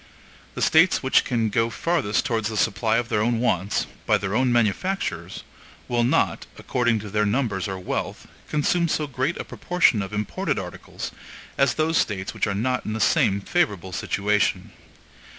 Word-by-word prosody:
The -, -, -1 dB
States 165 Hz, +1 st, +4 dB
which 130 Hz, -, +4 dB
can 115 Hz, -3 st, 0 dB
go 115 Hz, +3 st, +1 dB
farthest 135 Hz, -5 st, 0 dB
towards 110 Hz, -2 st, 0 dB
the 110 Hz, -, -4 dB
supply 110 Hz, +2 st, +1 dB
of 120 Hz, -1 st, -2 dB
their 105 Hz, -, +1 dB
own 120 Hz, +1 st, +1 dB
wants, 100 Hz, -5 st, 0 dB, 0.2 s
by -, -, +4 dB
their 100 Hz, -1 st, -3 dB
own 125 Hz, +1 st, +2 dB
manufactures, 110 Hz, -, -1 dB, 0.4 s
will 120 Hz, -1 st, +1 dB
not, 120 Hz, -, +1 dB
according 120 Hz, -2 st, 0 dB
to 105 Hz, -1 st, -8 dB
their 105 Hz, +1 st, +1 dB
numbers 105 Hz, -3 st, 0 dB
or 95 Hz, -1 st, -4 dB
wealth, 90 Hz, -, -4 dB, 0.2 s
consume 170 Hz, +3 st, +1 dB
so 155 Hz, -1 st, 0 dB
great 135 Hz, +3 st, -2 dB
a -, -, -4 dB
proportion 175 Hz, -11 st, +1 dB
of 95 Hz, 0 st, -5 dB
imported 105 Hz, -1 st, -2 dB
articles -, -, -6 dB, 0.4 s
as 140 Hz, -1 st, +2 dB
those 160 Hz, +1 st, +2 dB
States 95 Hz, -3 st, -2 dB
which -, -, -1 dB
are 100 Hz, -, -1 dB
not 125 Hz, +5 st, -1 dB
in 110 Hz, -, -4 dB
the 110 Hz, -, -3 dB
same 110 Hz, -5 st, +3 dB
favorable 100 Hz, -, 0 dB
situation. 105 Hz, +3 st, 0 dB
115 Hz, 170 wpm, -24 LUFS, 105-130 Hz, 0.4 s, States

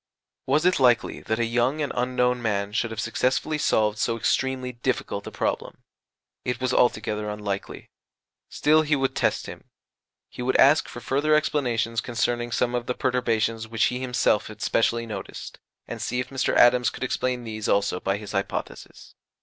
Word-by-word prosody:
Was 150 Hz, +5 st, +2 dB
it 180 Hz, -3 st, +3 dB
likely 125 Hz, -3 st, +3 dB
that 110 Hz, -, -2 dB
a 120 Hz, -, +1 dB
young 120 Hz, +5 st, +1 dB
and 145 Hz, -2 st, -2 dB
unknown 125 Hz, 0 st, +1 dB
man 100 Hz, -3 st, -1 dB
should 115 Hz, +2 st, -1 dB
have 110 Hz, -1 st, -6 dB
successfully 130 Hz, +7 st, 0 dB
solved 110 Hz, -7 st, +1 dB
so 115 Hz, -1 st, 0 dB
extremely 130 Hz, +2 st, 0 dB
difficult 120 Hz, -4 st, -3 dB
a -, -, -6 dB
problem? -, -, -3 dB, 0.6 s
It 125 Hz, -1 st, -2 dB
was 130 Hz, -1 st, -1 dB
altogether 105 Hz, -3 st, +1 dB
unlikely. 105 Hz, -2 st, -5 dB, 0.6 s
Still, 155 Hz, +1 st, +3 dB
he 155 Hz, -1 st, +1 dB
would 135 Hz, -1 st, -1 dB
test -, -, 0 dB
him: -, -, -10 dB, 0.6 s
he -, -, -9 dB
would 130 Hz, +1 st, 0 dB
ask 145 Hz, +3 st, +5 dB
for 120 Hz, -, -9 dB
further 145 Hz, +5 st, +2 dB
explanations 120 Hz, -7 st, 0 dB
concerning 120 Hz, 0 st, -1 dB
some 120 Hz, +1 st, 0 dB
of 120 Hz, -1 st, -2 dB
the 125 Hz, -, -1 dB
perturbations 115 Hz, -3 st, 0 dB
which 115 Hz, -1 st, -1 dB
he 125 Hz, -, -3 dB
himself 125 Hz, -4 st, +1 dB
had 110 Hz, +1 st, -9 dB
specially 115 Hz, 0 st, +1 dB
noticed, 110 Hz, -2 st, -8 dB, 0.3 s
and -, -, -6 dB
see 125 Hz, -, -2 dB
if 125 Hz, 0 st, -3 dB
Mr. 135 Hz, 0 st, 0 dB
Adams 125 Hz, 0 st, +5 dB
could -, -, -7 dB
explain 125 Hz, -1 st, -1 dB
these 110 Hz, -2 st, -4 dB
also 100 Hz, -2 st, +1 dB
by 95 Hz, +2 st, -1 dB
his 105 Hz, 0 st, -8 dB
hypothesis. 100 Hz, -1 st, -5 dB
120 Hz, 175 wpm, -25 LUFS, 110-130 Hz, 0.6 s, ask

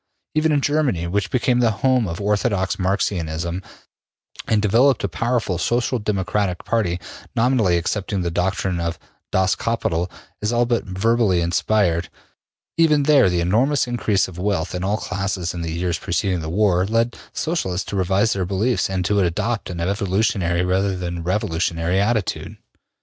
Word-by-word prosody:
Even 155 Hz, +1 st, +2 dB
in 145 Hz, -2 st, +2 dB
Germany, 140 Hz, -, +1 dB
which 95 Hz, +3 st, -1 dB
became 125 Hz, -1 st, +1 dB
the 120 Hz, -2 st, +4 dB
home 125 Hz, +2 st, +1 dB
of 85 Hz, 0 st, -5 dB
orthodox 100 Hz, -1 st, 0 dB
Marxianism 90 Hz, -3 st, -1 dB, 0.9 s
and 110 Hz, -, +2 dB
developed 115 Hz, +5 st, +3 dB
a -, -, +2 dB
powerful 115 Hz, -2 st, -1 dB
Social 120 Hz, +3 st, 0 dB
Democratic 100 Hz, -2 st, -1 dB
party, 100 Hz, -6 st, 0 dB, 0.4 s
nominally 115 Hz, -7 st, +3 dB
accepting 95 Hz, +2 st, -2 dB
the 85 Hz, -, -1 dB
doctrine 90 Hz, 0 st, -1 dB
of 85 Hz, -1 st, -2 dB, 0.3 s
``Das 95 Hz, 0 st, +2 dB
Kapital'' 90 Hz, -7 st, -1 dB, 0.3 s
as 105 Hz, +2 st, 0 dB
all 120 Hz, 0 st, +2 dB
but 120 Hz, -1 st, 0 dB
verbally 100 Hz, 0 st, +2 dB
inspired, 85 Hz, 0 st, +1 dB, 0.7 s
even 155 Hz, -3 st, +4 dB
there 140 Hz, -8 st, +5 dB
the 90 Hz, -1 st, 0 dB
enormous 125 Hz, +11 st, +2 dB
increase 110 Hz, -5 st, 0 dB
of 90 Hz, -2 st, -10 dB
wealth 95 Hz, -3 st, -1 dB
in 90 Hz, 0 st, -3 dB
all 100 Hz, +3 st, +1 dB
classes 95 Hz, -4 st, -3 dB
in 85 Hz, -, -5 dB
the 85 Hz, -, -3 dB
years 85 Hz, 0 st, -1 dB
preceding 90 Hz, 0 st, -1 dB
the 80 Hz, -, -5 dB
war 90 Hz, 0 st, +2 dB
led 115 Hz, +2 st, +1 dB, 0.2 s
Socialists 95 Hz, -, -2 dB
to -, -, -4 dB
revise 95 Hz, +4 st, +2 dB
their 95 Hz, -, -1 dB
beliefs 100 Hz, +3 st, 0 dB
and 95 Hz, -2 st, -1 dB
to 100 Hz, +1 st, +2 dB
adopt 100 Hz, +5 st, -1 dB
an 90 Hz, -1 st, -5 dB
evolutionary 95 Hz, -1 st, 0 dB
rather 95 Hz, +1 st, +1 dB
than 85 Hz, -1 st, -4 dB
a -, -, -5 dB
revolutionary 85 Hz, -1 st, 0 dB
attitude. 110 Hz, -1 st, -1 dB
95 Hz, 160 wpm, -21 LUFS, 90-115 Hz, 0.9 s, there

